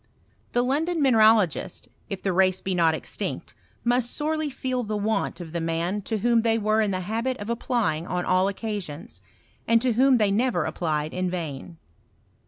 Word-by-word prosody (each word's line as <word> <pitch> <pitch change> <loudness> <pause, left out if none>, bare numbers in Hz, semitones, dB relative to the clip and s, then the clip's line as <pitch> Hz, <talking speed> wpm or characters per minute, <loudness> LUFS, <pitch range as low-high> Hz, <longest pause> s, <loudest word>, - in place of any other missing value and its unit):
The 245 - +2
London 315 +7 0
mineralogists 220 - +3 0.2
if 195 -2 -5
the 195 - 0
race 185 0 +3
be 190 - -3
not 165 -3 +3
extinct, - - -5 0.3
must 240 0 +2
sorely 310 +1 -1
feel 255 -1 -2
the 215 -2 -3
want 215 0 -1
of 170 -3 -8
the 170 - -2
man 165 +5 -1
to 220 - 0
whom 235 +2 +3
they 225 0 +2
were 215 0 +2
in 215 - +1
the 185 -1 -2
habit 230 +7 -2
of 205 +1 -5
applying 215 -9 -1
on 180 0 -2
all 185 +1 +3
occasions, 190 - -5 0.5
and 230 0 +5
to 250 -2 +2
whom 260 +2 +4
they 210 -3 +2
never 240 +5 +1
applied 155 -2 -2
in 185 0 -1
vain. 165 -2 -5
210 Hz, 180 wpm, -25 LUFS, 180-240 Hz, 0.5 s, and